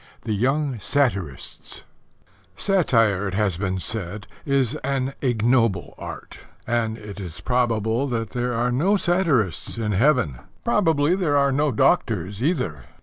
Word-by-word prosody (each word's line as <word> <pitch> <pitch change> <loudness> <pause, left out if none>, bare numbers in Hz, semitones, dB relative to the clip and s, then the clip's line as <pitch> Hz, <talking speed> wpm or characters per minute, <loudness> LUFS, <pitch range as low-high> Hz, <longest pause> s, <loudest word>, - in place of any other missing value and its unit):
(3) 110 - -2
THE 100 - -2
YOUNG 135 -1 0
SATIRISTS 100 - -2 0.7
Satire, 115 - +2
it 95 - -3
has 100 -5 +1
been 95 -1 -1
said, 105 +1 -4 0.2
is 135 -3 +2
an 135 -2 -2
ignoble 115 - +1
art; - - -8 0.3
and 115 -2 0
it 105 -2 -9
is 90 -4 -6
probable 120 0 0
that 115 -4 -3
there 125 -1 -1
are 120 +2 +1
no 180 +12 +2
satirists 150 - +1
in 110 -2 -1
Heaven. 105 - +2 0.3
Probably 165 -9 +2
there 165 -7 +1
are 140 -1 +3
no 145 +2 +1
doctors 105 - +1
either. 125 - -1
120 Hz, 140 wpm, -23 LUFS, 105-140 Hz, 0.7 s, are